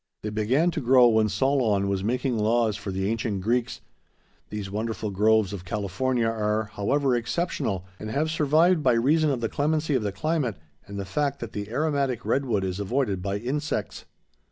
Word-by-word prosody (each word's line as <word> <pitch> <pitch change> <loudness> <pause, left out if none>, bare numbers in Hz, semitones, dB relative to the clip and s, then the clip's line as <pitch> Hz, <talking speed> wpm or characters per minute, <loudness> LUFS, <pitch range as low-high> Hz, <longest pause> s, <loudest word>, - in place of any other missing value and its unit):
They 105 - -3
began 125 +11 +2
to 160 - -3
grow 125 0 +6
when 110 -1 +3
Solon 115 -7 +1
was 100 -1 -1
making 125 +3 0
laws 110 0 +2
for 105 -1 -6
the 95 0 -2
ancient 110 -3 -2
Greeks. 120 +3 -1 0.7
These 100 -2 -5
wonderful 110 0 -3
groves 105 0 +3
of 95 -3 -6
California 105 +6 -1
are, 110 -1 -1
however, 135 +5 +1
exceptional, 120 - -2
and 110 - -6
have 155 +7 0
survived 160 +3 +3
by 130 -4 +3
reason 150 +7 +3
of 130 -4 -1
the 115 - 0
clemency 155 +3 0
of 130 - +2
the 105 -1 -2
climate 130 - -1 0.3
and 100 0 -7
the 100 - -4
fact 140 +8 -1
that 115 -2 -7
the 105 0 -5
aromatic 140 -2 -1
redwood 120 -8 0
is 95 0 -3
avoided 100 -2 -1
by 100 +1 -2
insects. 145 +7 -3
115 Hz, 180 wpm, -26 LUFS, 105-140 Hz, 0.7 s, grow